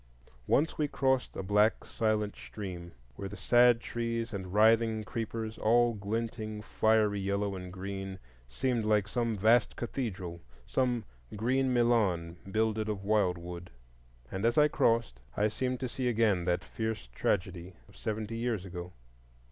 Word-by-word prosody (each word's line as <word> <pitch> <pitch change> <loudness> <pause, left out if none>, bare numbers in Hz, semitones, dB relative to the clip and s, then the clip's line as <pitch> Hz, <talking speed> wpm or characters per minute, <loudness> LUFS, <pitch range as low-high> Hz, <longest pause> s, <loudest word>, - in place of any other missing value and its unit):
Once 155 +3 +2
we 150 - +2
crossed 130 -2 0
a - - -4
black 105 +3 +3
silent 110 -2 0
stream, 90 -4 -7 0.3
where 100 - -5
the 100 - -8
sad 120 +4 +5
trees 115 0 -3
and 95 -2 -5
writhing 110 +1 +4
creepers, 110 +1 -4
all 120 +2 +4
glinting 110 +1 -3
fiery 110 -1 +2
yellow 100 0 -1
and 90 -1 -7
green, 95 0 -5 0.3
seemed 120 - 0
like 105 -2 +2
some 115 -1 -1
vast 110 +3 +4
cathedral,—some 110 - -3 0.3
green 130 +5 +1
Milan 105 -9 +2
builded 110 +1 0
of 100 -2 -3
wildwood. 90 -4 0 0.6
And 95 +2 -4
as 115 +1 +2
I 150 0 +6
crossed, 115 - +1 0.2
I 105 +1 +3
seemed 125 +3 -2
to 130 - -1
see 125 +1 -3
again 110 -6 +2
that 90 +1 +1
fierce 110 - -4
tragedy 90 +4 -1
of - - -19
seventy 110 +1 -3
years 115 -5 -1
ago. 90 -1 -7
110 Hz, 140 wpm, -31 LUFS, 95-115 Hz, 0.6 s, I